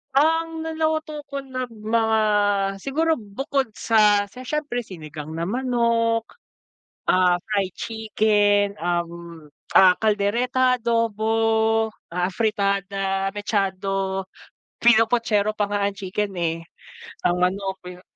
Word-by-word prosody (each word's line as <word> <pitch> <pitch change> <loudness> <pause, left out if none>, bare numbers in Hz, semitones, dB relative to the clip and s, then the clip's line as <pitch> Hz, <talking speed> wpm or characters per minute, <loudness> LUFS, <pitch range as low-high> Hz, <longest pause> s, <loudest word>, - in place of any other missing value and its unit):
Ang 325 +2 +1
naluto 315 -1 -2
ko 280 -1 -6
na 260 -2 -5
mga 220 0 +1 0.6
siguro 320 +4 +1
bukod 260 +4 -3
sa 210 -2 +3
sa 250 +6 -11
siyempre 285 -3 -2
sinigang 155 -6 -9
na 165 +1 -3
manok, 235 -1 0 0.7
ah, 180 -1 +3
fried 200 -4 0
chicken, 210 -2 +1
um, 170 -2 -4 0.2
ah, 185 -1 +7
caldereta, 240 +5 +1
adobo, 230 -2 0 0.9
ah, 180 +1 0
afritada, 195 -2 -1
mechado, 195 -2 -2 0.6
pinopochero 225 -2 +3
pa 210 - 0
nga 205 - 0
ang 200 - -4
chicken, 200 +1 -3
eh, 165 -1 -1 0.7
ang 175 - +3
manok, 190 +2 0
pino 180 0 -10
210 Hz, 105 wpm, -23 LUFS, 190-240 Hz, 0.9 s, ah